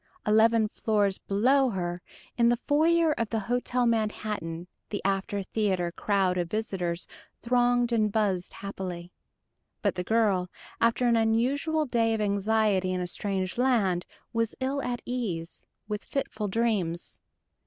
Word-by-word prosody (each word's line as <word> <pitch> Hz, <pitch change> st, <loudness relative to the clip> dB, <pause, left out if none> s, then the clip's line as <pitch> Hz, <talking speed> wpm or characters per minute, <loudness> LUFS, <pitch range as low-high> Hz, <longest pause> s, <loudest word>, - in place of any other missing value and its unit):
Eleven 220 Hz, +1 st, +4 dB
floors 205 Hz, -3 st, 0 dB
below 260 Hz, +7 st, +3 dB
her, 175 Hz, -4 st, -3 dB, 0.3 s
in 235 Hz, -1 st, +4 dB
the 240 Hz, -, +3 dB
foyer 320 Hz, +5 st, +3 dB
of 230 Hz, -2 st, -1 dB
the 225 Hz, -2 st, -1 dB
Hotel 245 Hz, +3 st, 0 dB
Manhattan, 210 Hz, -7 st, -1 dB, 0.2 s
the 205 Hz, -, -3 dB
after 195 Hz, +1 st, 0 dB
theater 185 Hz, -4 st, 0 dB
crowd 190 Hz, -1 st, +1 dB
of 175 Hz, -1 st, -2 dB
visitors 185 Hz, -5 st, -2 dB, 0.4 s
thronged 245 Hz, 0 st, +2 dB
and 215 Hz, -3 st, +2 dB
buzzed 195 Hz, -4 st, 0 dB
happily. 180 Hz, -3 st, -6 dB, 0.7 s
But -, -, +2 dB
the 180 Hz, -, -3 dB
girl, 200 Hz, -4 st, +2 dB, 0.3 s
after 235 Hz, +2 st, +3 dB
an 235 Hz, -1 st, +4 dB
unusual 265 Hz, +8 st, +1 dB
day 230 Hz, -3 st, +1 dB
of -, -, -3 dB
anxiety 205 Hz, -2 st, +1 dB
in 185 Hz, -, -1 dB
a 180 Hz, -, -1 dB
strange 190 Hz, +2 st, -2 dB
land, 210 Hz, -9 st, +2 dB, 0.3 s
was 230 Hz, -1 st, 0 dB
ill 270 Hz, +2 st, -1 dB
at 245 Hz, -2 st, -3 dB
ease, 195 Hz, -10 st, -4 dB, 0.2 s
with 210 Hz, 0 st, -3 dB
fitful 220 Hz, -6 st, -3 dB
dreams. 195 Hz, -6 st, -1 dB
215 Hz, 140 wpm, -28 LUFS, 190-235 Hz, 0.7 s, Eleven